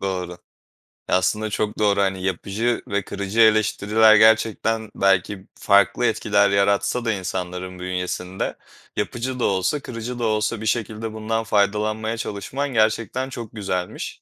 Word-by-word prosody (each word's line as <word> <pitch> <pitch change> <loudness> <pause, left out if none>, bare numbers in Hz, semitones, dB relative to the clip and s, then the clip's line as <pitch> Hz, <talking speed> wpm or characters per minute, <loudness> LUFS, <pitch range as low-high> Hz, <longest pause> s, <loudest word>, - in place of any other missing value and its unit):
doğru. 90 -2 -4 0.7
Aslında 105 +4 +1
çok 105 +1 -2
doğru. 100 -1 +3
Hani, 95 -1 -1
yapıcı 100 +6 -1
ve 100 -1 -1
kırıcı 100 +2 -4
eleştiriler, 110 0 +5
gerçekten 110 0 +3
belki 95 0 +1
farklı 100 -1 +3
etkiler 100 0 +2
yaratsa 100 +4 +1
da 115 - +2
insanların 90 -1 -5
bünyesinde, 90 0 -3 0.4
yapıcı 125 +2 -3
da - - +1
olsa, 95 +9 +1
kırıcı 120 -1 -6
da 120 - -2
olsa 110 0 0
bir - - -5
şekilde 110 0 -2
bundan 110 +1 -2
faydalanmaya 110 +2 0
çalışman 125 +8 -4
gerçekten 115 +4 +1
çok 115 -3 -8
güzelmiş. 95 -3 -4
105 Hz, 130 wpm, -22 LUFS, 95-110 Hz, 0.7 s, eleştiriler